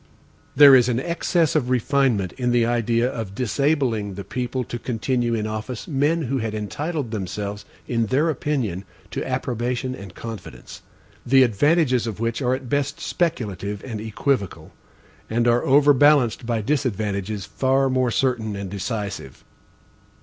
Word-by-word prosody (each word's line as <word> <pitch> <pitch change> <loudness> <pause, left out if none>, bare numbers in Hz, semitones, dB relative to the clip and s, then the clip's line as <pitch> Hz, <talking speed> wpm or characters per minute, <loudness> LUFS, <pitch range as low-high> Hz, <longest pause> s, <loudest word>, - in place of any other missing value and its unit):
There 140 -1 +9
is 125 -1 +4
an 120 0 +1
excess 170 +1 0
of 130 -5 +1
refinement 125 -6 +1
in 125 -2 -2
the 120 -1 +3
idea 115 0 +1
of 110 -6 -5
disabling 125 -5 0
the 100 - -6
people 125 +6 -3
to 120 0 -6
continue 120 +1 -1
in 110 -1 -2
office 110 +3 -5
men 155 +3 +1
who 135 0 -1
had 110 -2 -3
entitled 140 +5 -3
themselves, 105 0 -4 0.2
in 115 -2 0
their 140 +8 +2
opinion, 130 - -2 0.3
to - - -3
approbation 125 0 -2
and 100 -6 -10
confidence; 90 - -9 0.4
the 135 +1 +5
advantages 130 - +2
of 110 -2 -5
which 115 +3 -2
are 125 0 +2
at 130 -1 -8
best 140 +2 -1
speculative 105 - -2
and 110 -5 -5
equivocal, 110 -1 -2 0.6
and 120 +2 +1
are 120 0 +3
overbalanced 140 -3 +4
by 115 -2 0
disadvantages 105 -6 -2
far 135 +1 +1
more 130 -1 +1
certain 115 -2 0
and 100 -2 -6
decisive. 100 - -5
120 Hz, 145 wpm, -23 LUFS, 105-135 Hz, 0.6 s, There